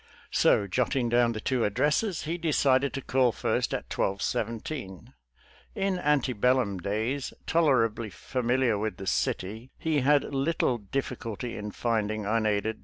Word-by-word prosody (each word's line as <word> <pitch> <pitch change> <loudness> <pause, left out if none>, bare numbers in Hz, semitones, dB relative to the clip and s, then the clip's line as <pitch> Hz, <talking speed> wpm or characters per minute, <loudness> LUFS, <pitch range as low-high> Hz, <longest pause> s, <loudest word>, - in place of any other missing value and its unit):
Sbj. 100 -2 +3
jotting 125 +1 +1
ddwn 120 -1 +3
the 110 - -4
two 125 +2 0
addresses, 150 - +1
he 160 +2 -2
decided 140 -5 +2
to 135 - -4
call' 130 -2 +3
first - - -1
at - - -2
1217. 100 - -3 0.6
In 195 -2 0
ante 145 -4 +2
bellum 120 -3 +2
idays 110 +9 -2
toler 145 -8 +4
ably 110 0 -5
familiar 125 -1 0
with 110 0 -2
the 95 - -7
city, 110 +5 -2
he 160 -2 0
■ - - -1
had 145 +1 +4
little 135 -3 +1
difS 125 +5 -3
culty 115 +1 -5
in 105 0 -5
'/finding, 110 -2 -1
unaidedj! 110 0 0
120 Hz, 150 wpm, -28 LUFS, 110-135 Hz, 0.6 s, toler